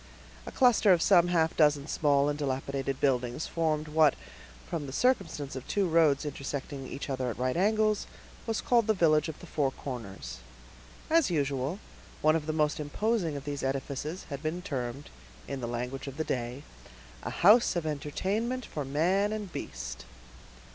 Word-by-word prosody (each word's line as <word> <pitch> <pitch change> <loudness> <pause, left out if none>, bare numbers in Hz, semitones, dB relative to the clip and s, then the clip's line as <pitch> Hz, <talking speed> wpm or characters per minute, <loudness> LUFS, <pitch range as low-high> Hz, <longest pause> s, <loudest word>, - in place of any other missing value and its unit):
A - - -5
cluster 245 -6 +5
of 175 - +5
some 175 -1 +5
half 165 -2 +2
dozen 150 -3 +3
small 145 -2 +2
and 145 - 0
dilapidated 135 -1 -2
buildings 125 +1 0
formed 155 -2 -1
what, 150 -2 +4 0.5
from 155 -4 -3
the - - -6
circumstance 165 - 0
of 130 - -7
two 200 -2 +1
roads 160 -4 +3
intersecting 140 -1 -5
each 140 - -6
other 130 -2 -2
at 115 - -5
right 130 +1 0
angles, 215 +3 +2 0.4
was 225 -1 -1
called 235 -3 +3
the 220 - +3
village 155 -3 +3
of 155 - -8
the - - -10
Four 145 -5 0
Corners. 100 - -7 0.7
As 325 -6 +3
usual, 140 0 -1 0.5
one 155 +1 +5
of 160 -1 -2
the - - +1
most 155 -1 +1
imposing 170 +2 -1
of 140 - -8
these 145 -1 -3
edifices 140 +5 -3
had 140 -1 -4
been 165 +3 -3
termed, 135 -4 -4 0.4
in 140 -1 -4
the 120 - -3
language 125 +3 -4
of 135 0 -7
the 155 - 0
day, 125 0 -3 0.6
"a - - -4
house 215 +5 +5
of 170 -2 -1
entertainment 200 - -2
for 150 - -4
man 175 +9 +1
and 210 -4 -5
beast." - - -6
150 Hz, 170 wpm, -29 LUFS, 135-175 Hz, 0.7 s, cluster